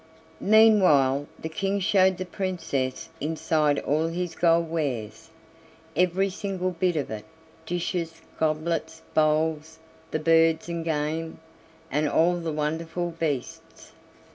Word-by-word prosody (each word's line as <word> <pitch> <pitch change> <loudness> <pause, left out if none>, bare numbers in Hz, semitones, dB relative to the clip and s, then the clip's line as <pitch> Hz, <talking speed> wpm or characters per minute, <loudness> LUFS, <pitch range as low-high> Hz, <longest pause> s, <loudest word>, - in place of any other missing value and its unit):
Meanwhile 185 -11 +5
the - - -5
King 195 +4 -1
showed 190 -1 +3
the 185 - -4
Princess 170 -9 -3
inside 155 -1 +1
all 155 +4 0
his 170 0 -3
gold 170 0 +3
wares, 130 -4 -3 0.7
every 180 +3 +2
single 185 -1 -3
bit 180 0 0
of 145 -6 -2
it 110 -1 -6 0.4
dishes, 170 -1 -3 0.2
goblets, 160 +1 -1
bowls, 155 +1 +1 0.3
the - - -1
birds 165 +1 +3
and 170 -1 -3
game, 160 +1 -2 0.5
and 150 +1 +1
all 175 +4 +3
the 165 -2 -3
wonderful 160 +3 -2
beasts. 155 -6 -5
165 Hz, 115 wpm, -26 LUFS, 155-175 Hz, 0.7 s, Meanwhile